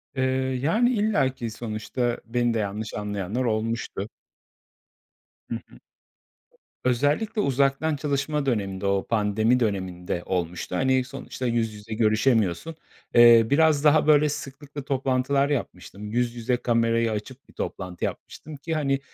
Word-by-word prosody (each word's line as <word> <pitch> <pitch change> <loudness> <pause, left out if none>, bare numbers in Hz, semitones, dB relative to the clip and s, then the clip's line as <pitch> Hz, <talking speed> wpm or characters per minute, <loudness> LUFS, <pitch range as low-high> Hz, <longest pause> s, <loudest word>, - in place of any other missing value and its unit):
Eee, 130 - 0 0.4
yani, 220 - +3
illaki 200 - 0
sonuçta 115 +2 -3
beni 120 +1 0
de 115 - 0
yanlış 105 +1 -4
anlayanlar 105 +3 -3
olmuştu. 110 -2 -2 1.4
Hı - - -2
hı. - - -17 1.0
Özellikle 145 - +1
uzaktan 140 +1 +1
çalışma 145 0 -1
döneminde, 100 -6 -1
o 100 0 0
pandemi 110 +2 +2
döneminde 95 -5 -2
olmuştu. 90 0 -3
Hani, 130 +3 +2
sonuçta 130 0 -7
yüz 115 -2 0
yüze 105 +1 -8
görüşemiyorsun, 110 - +1 0.4
eee, 120 -1 +8
biraz 150 0 +4
daha 150 0 +4
böyle 150 0 +5
sıklıkla 145 +1 -7
toplantılar 135 0 +1
yapmıştım. 105 -6 -4
Yüz 120 +1 0
yüze 120 +1 0
kamerayı 115 -1 +1
açıp 120 +6 -6
bir - - -18
toplantı 90 -2 -4
yapmıştım 155 0 -7
ki, 160 +4 -4
hani, 140 -3 +1
120 Hz, 125 wpm, -25 LUFS, 110-140 Hz, 1.4 s, eee